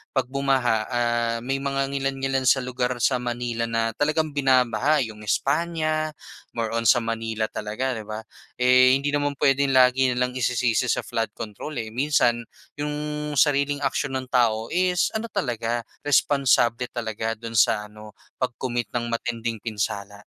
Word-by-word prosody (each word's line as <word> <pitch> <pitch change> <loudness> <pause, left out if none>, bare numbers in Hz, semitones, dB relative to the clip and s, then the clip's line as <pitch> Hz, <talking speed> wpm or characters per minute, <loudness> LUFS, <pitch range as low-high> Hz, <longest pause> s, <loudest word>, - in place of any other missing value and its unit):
'pag 130 -2 +1
bumaha 135 -4 +2
ah, 120 -1 0
may 135 +2 -1
mga 135 0 -1
ngilan-ngilan 135 -1 -1
sa 130 -1 +4
lugar 125 0 -1
sa 130 - +3
Manila 120 -1 -2
na 115 0 0
talagang 155 +1 0
binabaha, 135 +1 +3
'yong 110 -2 -8
España, 155 +3 0 0.4
more 115 -1 -2
on 115 -1 0
sa 120 -1 +5
Manila 115 -1 -2
talaga, 110 +5 -3
'di 110 -1 -7
ba? 110 +1 -5 0.3
Eh, 125 +1 +5
hindi 140 +1 -1
naman 145 -1 0
puwedeng 135 0 +2
lagi 130 +1 +5
na - - -6
lang 125 - -1
isisisi 125 -1 +1
sa - - 0
flood 115 -2 -2
control, 115 +8 -7
eh. 110 - -9
Minsan 120 -2 +2 0.4
'yong 150 0 -2 0.4
sariling 145 0 +2
aksyon 135 0 -1
ng 130 -1 -3
tao 115 -3 +2
is 180 0 +2
ano 220 +1 -3
talaga, 120 - -2 0.2
responsable 130 -4 +3
talaga 115 -1 -3
do'n 115 +1 -8
sa 105 -2 +2
ano, 105 0 -13
sa 130 - -4
pag-commit 120 -1 -3
ng 120 - 0
matinding 115 -1 -2
pinsala. 100 -2 -4
125 Hz, 155 wpm, -24 LUFS, 115-140 Hz, 0.4 s, sa